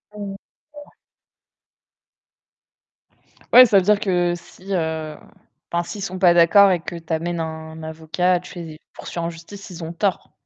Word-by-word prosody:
Mmh. 200 -1 -6 0.4
Ouais. 295 0 -12 2.6
Ouais, 250 +1 +10
ça 215 -4 +4
veut - - +5
dire 205 +2 +3
que 175 -3 +1
si, 185 +3 -13
heu, 160 -2 -3 0.5
enfin, 170 0 0
si 175 - -8
ils - - -7
sont 185 -1 -5
pas 175 -2 +5
d'accord 195 +4 +6
et 180 - +1
que 170 - -7
tu 165 0 -12
amènes 170 +1 -2
un 160 0 -6
avocat, 160 +3 -1
tu 180 0 -11
les 160 -2 -9
poursuis - - -9
en 170 0 -2
justice, 190 +4 -12
ils 175 -1 -8
ont 165 - -5
tort. 190 +2 -2
175 Hz, 165 wpm, -21 LUFS, 160-195 Hz, 2.6 s, Ouais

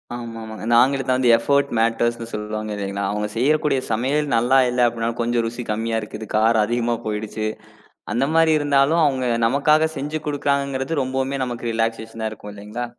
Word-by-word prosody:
ஆமாம்மா. 115 -2 -7
அந்த 120 +1 +3
ஆங்கிலத்துல 130 -2 +2
எஃப்பர்ட் 140 +3 +1
மேட்டர்ஸ் 115 +1 +1
ன்னு 115 0 -7
சொல்லுவாங்க 105 0 -4
இல்லீங்களா? 100 0 -3
அவங்க 105 0 -2
செய்யக்கூடிய 150 +1 +2
சமையல் 135 +6 0
நல்லா 125 +3 +3
இல்ல 125 0 0
அப்படின்னாலும் 115 0 -3
கொஞ்சம் 120 0 0
ருசி 120 +1 -5
கம்மியா 115 +1 -1
இருக்குது, 105 +1 -8
காரம் 110 0 +3
அதிகமா 120 +1 0
போயிடுச்சு, 110 0 -3 0.7
அந்த 120 +4 +1
மாரி 165 -1 +4
இருந்தாலும் 145 +3 +3
அவங்க 130 -3 0 0.2
நமக்காகச் 150 +5 +2
செஞ்சு 150 +3 -3
கொடுக்கிறாங்கன்றது 140 0 -1
ரொம்பவுமே 130 +1 -2
நமக்கு 120 -1 -4
ரிலாக்ஸேஷன்னா 115 0 -2
இருக்கும் 105 -1 -10
இல்லைங்களா? 105 +4 -6
120 Hz, 150 wpm, -21 LUFS, 110-140 Hz, 0.7 s, மாரி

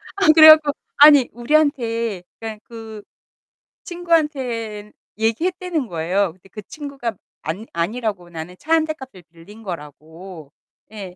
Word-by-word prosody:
아 395 -1 +1
그래 315 -1 +10
갖고 310 -2 +7 0.3
아니 290 -3 +7
우리한테 235 - 0 0.2
그러니깐 220 -1 -7
그 220 -2 -10 0.8
친구한테 265 -12 -2 0.3
얘기했다는 330 - -1
거예요. 175 +2 -1
근데 185 +2 -23
그 210 - -9
친구가 275 - -7 0.3
안 180 +8 -5
아니라고 195 +1 -3
나는 170 +1 -8
차 320 +2 -2
1 320 -1 +3
대 310 - -3
값을 260 - -13
빌린 175 +7 -16
거라고 160 -1 -10 0.4
예 195 -4 -9
225 Hz, 275 characters per minute, -20 LUFS, 185-295 Hz, 0.8 s, 그래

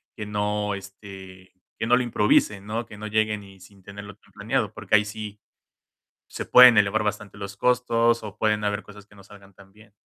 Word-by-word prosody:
que 105 -3 -6
no, 105 0 -2
este 95 -1 -12 0.3
que 115 - -3
no 125 +1 +4
lo 125 - 0
improvisen, 105 -3 +1
¿no?, 115 +2 -4
que 105 -2 -13
no 110 - -7
lleguen 110 -1 -1
y 95 -1 -16
sin 95 0 -18
tenerlo 100 0 -11
todo - - -28
planeado, - - -2
porque - - 0
ahí 105 - +4
sí 105 -1 -8 0.9
se - - -6
pueden 125 -2 +8
elevar 105 +1 +2
bastante 105 -1 -5
los 100 -1 -8
costos 120 0 +1
o 105 -3 -9
pueden 105 -1 0
haber 105 0 -2
cosas 105 0 -15
que 105 - -22
no 100 - -16
salgan 100 0 -17
tan 95 0 -18
bien. 105 0 -20
105 Hz, 205 wpm, -24 LUFS, 100-110 Hz, 0.9 s, pueden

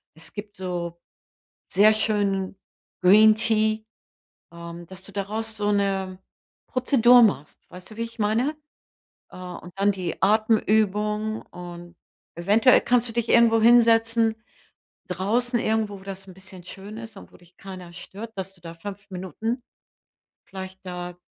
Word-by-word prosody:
Es 160 +1 -8
gibt 205 0 -8
so 175 -2 -4 0.7
sehr 215 +2 +5
schönen 200 -3 0 0.5
Green 215 +4 +7
Tea, 220 -1 +1 0.7
ähm, 170 0 -9
dass 190 +1 -12
du 200 - -12
daraus 215 +3 -3
so 205 -1 0
'ne 195 -2 -1 0.5
Prozedur 250 -2 +5
machst. 150 -9 +1
Weißt 180 +2 -12
du, - - -12
wie 230 - -3
ich 230 0 -7
meine? 225 +8 +1 0.8
Äh, - - -11
und 180 -1 -9
dann 200 +1 +4
die 185 -4 -5
Atemübung 215 0 +2
und 175 0 -11 0.4
eventuell 210 +8 +4
kannst 245 -1 +2
du - - -7
dich 235 0 -1
irgendwo 230 -1 +5
hinsetzen. 230 -1 +4 0.7
Draußen 230 +7 0
irgendwo, 215 -2 -1
wo - - -16
das 195 0 -7
'n 185 - -11
bisschen 190 -1 -12
schön 200 +3 -9
ist 225 -2 -10
und - - -13
wo - - -15
dich 175 0 -24
keiner 185 -3 -10
stört, 200 +6 -7
dass 190 0 -6
du 180 - -22
da 165 0 -9
5 200 +3 -9
Minuten 220 +7 -4 0.8
vielleicht 190 0 -9
da 180 -1 -6
205 Hz, 145 wpm, -24 LUFS, 185-220 Hz, 0.8 s, Green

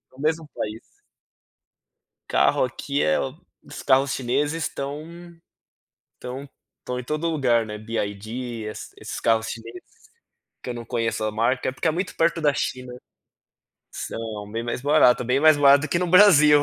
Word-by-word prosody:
No 135 - -11
mesmo 160 0 0
país. 110 +1 -4 1.5
Carro 70 - +3
aqui 140 +3 -2
é 75 0 +2
o 135 +2 -4 0.3
os - - -9
carros 135 0 +3
chineses 145 +5 -1
estão 140 +2 -4 1.1
estão 130 +3 -8 0.3
estão 125 0 -5
em 125 - -6
todo 155 +5 -2
lugar, 125 -7 +2
né, 105 -1 -7
Byd, 110 -1 -4 0.4
esses 110 - -8
esses - - -6
carros 115 0 +2
chineses, 115 +1 -8 0.8
que 125 - -4
eu - - -5
não 120 -1 -7
conheço 115 -3 -2
a 110 - -1
marca, 120 +5 0
é - - -4
porque 130 +6 -2
é 160 - +3
muito 185 +4 -3
perto 165 0 +1
da 150 - +4
China, 125 -2 -4 1.0
são 105 -2 -6
bem 115 - -2
mais 120 +1 -4
barato, 145 -4 +4
é - - -7
bem 130 +3 +2
mais 155 0 +6
barato 145 +1 +5
que 170 - +1
no 180 - 0
Brasil, 150 -6 +7
130 Hz, 165 wpm, -24 LUFS, 115-150 Hz, 1.5 s, Brasil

